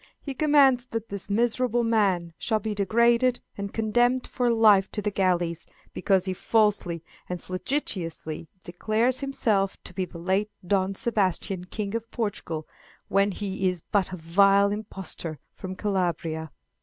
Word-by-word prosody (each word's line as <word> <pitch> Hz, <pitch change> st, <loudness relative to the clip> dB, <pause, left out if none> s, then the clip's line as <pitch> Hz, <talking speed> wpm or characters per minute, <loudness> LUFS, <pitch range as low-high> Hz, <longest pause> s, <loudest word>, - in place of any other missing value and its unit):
He 280 Hz, -, -6 dB
commands 270 Hz, -4 st, +4 dB
that 225 Hz, -2 st, -4 dB
this 200 Hz, 0 st, -6 dB
miserable 240 Hz, +2 st, +2 dB
man 195 Hz, -7 st, +1 dB
shall 220 Hz, -, +1 dB
be 215 Hz, 0 st, -3 dB
degraded 235 Hz, +5 st, +3 dB, 0.2 s
and 200 Hz, 0 st, -5 dB
condemned 240 Hz, +3 st, +2 dB
for 245 Hz, -1 st, 0 dB
life 215 Hz, -4 st, +5 dB
to -, -, -2 dB
the 210 Hz, 0 st, -1 dB
galleys, 175 Hz, -4 st, 0 dB, 0.3 s
because 190 Hz, 0 st, +2 dB
he 190 Hz, -, -1 dB
falsely 195 Hz, -5 st, +1 dB, 0.3 s
and 180 Hz, -1 st, -3 dB
flagitiously 180 Hz, -, -3 dB, 0.2 s
declares 220 Hz, +8 st, 0 dB
himself 215 Hz, -8 st, 0 dB
to -, -, -8 dB
be 185 Hz, -, -1 dB
the 170 Hz, -, -11 dB
late 190 Hz, +5 st, 0 dB, 0.2 s
Don 195 Hz, +1 st, +1 dB
Sebastian, 190 Hz, -4 st, 0 dB
King 200 Hz, +2 st, -4 dB
of 230 Hz, 0 st, -3 dB
Portugal, 180 Hz, -9 st, -3 dB, 0.4 s
when 195 Hz, +1 st, +3 dB
he 190 Hz, -1 st, -1 dB
is 180 Hz, -3 st, -5 dB
but 200 Hz, -4 st, +2 dB
a 185 Hz, -, -5 dB
vile 195 Hz, +4 st, +4 dB
impostor 190 Hz, -6 st, -4 dB, 0.2 s
from 185 Hz, 0 st, -7 dB
Calabria!" 170 Hz, -5 st, -1 dB
200 Hz, 145 wpm, -26 LUFS, 185-230 Hz, 0.4 s, life